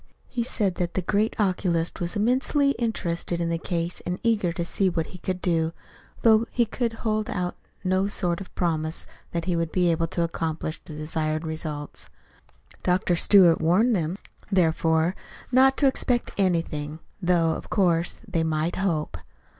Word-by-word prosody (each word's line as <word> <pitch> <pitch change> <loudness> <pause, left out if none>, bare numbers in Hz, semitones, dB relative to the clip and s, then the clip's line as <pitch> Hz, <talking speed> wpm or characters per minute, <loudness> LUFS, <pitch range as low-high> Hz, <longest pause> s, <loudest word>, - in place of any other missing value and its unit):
He 245 - -2
said 210 -6 -1
that 175 -1 -2
the 185 - 0
great 210 +5 0
oculist 180 -4 0
was 175 +3 -2
immensely 260 +6 +2
interested 175 -7 -2
in 170 -1 0
the 165 0 -1
case 170 0 -3
and 180 +1 -2
eager 215 -7 +2
to 170 0 -3
see 190 +2 +1
what 165 -2 -1
he 180 - -9
could 185 +1 -3
do 165 -2 0 0.5
though 225 0 +5
he 240 - +2
could 230 +1 -2
hold 215 -1 0
out 180 -1 -2 0.3
no 185 +1 +2
sort 180 -3 0
of 185 - -11
promise 160 -2 -1 0.3
that 170 -1 -2
he 180 -1 0
would 165 -1 -1
be 180 -2 +3
able 165 0 0
to 170 +1 -1
accomplish 160 -1 -3
the 160 -4 -10
desired 155 +1 -2
results. 155 -2 -5 0.7
Dr. 180 0 +2
Stewart 175 -2 +6
warned 200 +9 +3
them, 170 0 -1 0.3
therefore, 165 -1 +2 0.4
not 265 +1 +5
to 285 - +3
expect 250 -2 0
anything 165 -5 0 0.2
though, 175 -2 +3
of - - -5
course, 175 -4 +1
they 165 - 0
might 160 +1 -1
hope. 160 - -1
175 Hz, 165 wpm, -25 LUFS, 165-200 Hz, 0.7 s, Stewart